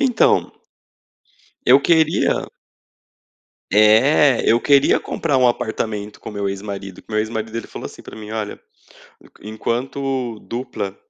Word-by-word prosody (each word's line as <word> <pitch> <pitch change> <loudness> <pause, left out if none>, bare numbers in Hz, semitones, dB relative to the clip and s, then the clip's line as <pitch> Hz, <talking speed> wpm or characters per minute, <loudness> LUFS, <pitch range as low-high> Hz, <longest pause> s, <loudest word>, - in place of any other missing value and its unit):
Então 255 -5 +2 1.1
eu 130 +3 +7
queria 160 0 +2 1.2
É, 115 +6 +5
eu 115 - +4
queria 140 0 +4
comprar 150 -5 -2
um 130 - +4
apartamento 110 -3 -2
com - - -9
meu 100 -1 -2
ex-marido. 100 -1 -6
Que - - -31
meu 110 -1 -1
ex-marido 110 +1 -4
ele 115 - -5
falou - - -7
assim - - -12
pra - - -11
mim: 105 -1 -9
"Olha, 110 -2 -4 0.6
enq - - -21
enquanto 125 +2 -3
dupla" 115 -5 -5
115 Hz, 130 wpm, -20 LUFS, 105-135 Hz, 1.2 s, eu